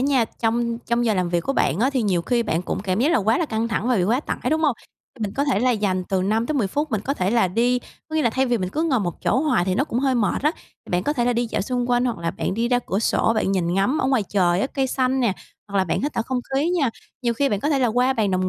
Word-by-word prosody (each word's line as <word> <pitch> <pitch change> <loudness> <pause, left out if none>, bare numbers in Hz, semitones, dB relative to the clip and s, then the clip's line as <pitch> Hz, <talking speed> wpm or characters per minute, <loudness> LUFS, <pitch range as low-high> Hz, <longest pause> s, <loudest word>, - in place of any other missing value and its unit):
nha, 265 -3 +3
trong 230 +1 -1
trong 235 0 -1
giờ 220 -2 +2
làm 180 -2 0
việc 170 0 +1
của 270 - -2
bạn 170 - +1
á, 260 +4 +3
thì 265 -3 0
nhiều 185 -5 +1
khi 240 +5 +1
bạn 170 -5 -1
cũng - - -3
cảm 190 0 -1
giác 300 +7 +3
là - - +4
quá 220 +1 +2
là 335 - 0
căng 225 -2 -1
thẳng 225 +1 -1
và 250 - +3
bị 180 - +2
quá 235 +7 +1
tải, - - -4
đúng 315 +1 +1
hông? 285 -6 +2 0.4
Thì 230 - -7
mình 205 -2 -2
có 280 - +1
thể 265 -8 +1
là 255 +1 +3
dành 200 -5 0
từ 190 -1 +1
5-10 225 +5 0
phút 295 +10 -2
mình 215 -4 0
có 270 +7 -2
thể 185 -7 0
là 230 -5 +3
đi 240 +6 +2 0.3
có 315 - -3
nghĩa 310 - +2
là 235 - +2
thay 265 +4 +1
vì 245 -2 +1
mình 185 -2 -2
cứ 300 +12 -2
ngồi 280 -8 +1
một 175 -4 -4
chỗ 260 - +2
hoài 295 - +2
thì 185 0 0
nó 270 - +1
cũng 240 -5 -3
hơi 265 -1 +1
mệt 230 -1 0
á, 300 +2 +2 0.4
bạn 180 0 +1
có 295 - 0
thể 240 -4 0
là 245 - +2
đi 240 0 0
dạo - - -2
xung 245 +2 -2
quanh, 245 0 +3
hoặc 240 -6 -1
là 170 0 -2
bạn 185 - -3
đi 230 +3 0
ra 245 0 +3
cửa 195 - 0
sổ 225 0 +2
bạn 195 -3 0
nhìn 175 -2 0
ngắm 225 +10 +1
ở - - +1
ngoài 265 -4 +2
trời 180 -3 +2
á, - - +1
cây 270 -1 -1
xanh 260 0 0
nè, 235 -5 +2 0.4
hoặc 200 - -3
là 190 - +3
bạn 170 - -1
hít 290 +1 -1
thở - - 0
không 255 +2 -2 0.2
khí 290 +5 +1
nha. 315 -9 +1 0.3
Nhiều 235 -1 +1
khi 275 +4 +1
bạn 205 -2 -1
có 290 - 0
thể 290 -3 +2
là 255 - +3
qua 250 +4 +2
bàn 215 -5 0
đồng 185 0 0
235 Hz, 325 wpm, -22 LUFS, 195-265 Hz, 0.4 s, là